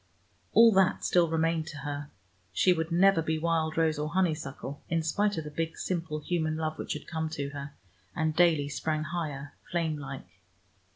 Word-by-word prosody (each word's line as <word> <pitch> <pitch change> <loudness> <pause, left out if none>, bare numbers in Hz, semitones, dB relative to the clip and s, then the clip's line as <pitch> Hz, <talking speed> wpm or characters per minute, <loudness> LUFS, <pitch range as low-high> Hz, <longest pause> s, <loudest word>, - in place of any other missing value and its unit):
All 230 +1 +8
that 190 -2 +3
still 175 -2 +3
remained 165 0 +1
to 155 - -7
her: 145 0 -5 0.4
she 180 - +4
would 160 0 -3
never 185 0 +5
be 160 0 -1
wild 160 -1 0
rose 160 -2 +2
or 150 +1 -1
honeysuckle, 155 -5 -2
in 165 -1 +1
spite 205 +5 +1
of 160 - -2
the 150 - -7
big 165 +1 -3
simple 165 -4 -2
human 155 -1 -1
love 155 -1 -3
which - - -3
had 150 - -7
come 160 -1 -3
to 145 -3 -3
her, 140 0 -7 0.4
and 160 -1 0
daily 160 -4 +4
sprang 155 +2 -2
higher, 150 -4 -4 0.2
flame 160 -3 -1
like. 135 -1 -9
160 Hz, 180 wpm, -29 LUFS, 150-170 Hz, 0.4 s, All